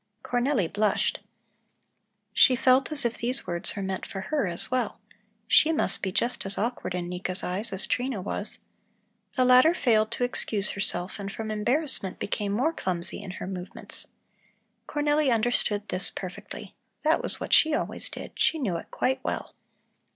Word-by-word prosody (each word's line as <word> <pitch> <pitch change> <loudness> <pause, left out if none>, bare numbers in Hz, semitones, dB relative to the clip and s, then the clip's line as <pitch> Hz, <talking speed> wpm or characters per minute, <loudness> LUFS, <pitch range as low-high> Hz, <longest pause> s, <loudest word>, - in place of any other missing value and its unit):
Cornelli 245 - +1
blushed. 205 +3 0 1.1
She 255 - +6
felt 260 +3 +3
as 290 -4 +2
if 235 -1 -1
these 250 +3 +1
words 175 -1 +1
were 200 - -3
meant 190 0 -4
for 195 - -6
her 280 +1 -1
as 170 +6 -2
well. 250 -4 -1 0.5
She 310 - +6
must 320 - 0
be 190 - -2
just 235 +6 -1
as 195 0 -2
awkward 225 -4 -2
in 175 -1 -3
Nika's 180 +1 -4
eyes 200 +6 -3
as 190 0 0
Trina 250 -3 -1
was. 205 +2 -4 0.8
The 255 - +2
latter 255 +7 +6
failed 220 -8 +2
to 245 - -1
excuse 210 -4 +1
herself 185 -1 0
and 200 0 -5
from 220 +1 -5
embarrassment 240 - +2
became 205 0 -2
more 260 +11 +1
clumsy 180 - -3
in 200 - -8
her - - -6
movements. 185 -1 -8 0.8
Cornelli 295 -1 +1
understood 220 -2 +2
this 185 +1 0
perfectly; 180 -2 -8 0.3
that 315 +2 +3
was - - +2
what - - -3
she 315 -1 +6
always - - -3
did, - - -8
she 325 - +3
knew 205 - -1
it - - -9
quite 260 0 -1
well. - - -4
215 Hz, 165 wpm, -27 LUFS, 190-255 Hz, 1.1 s, She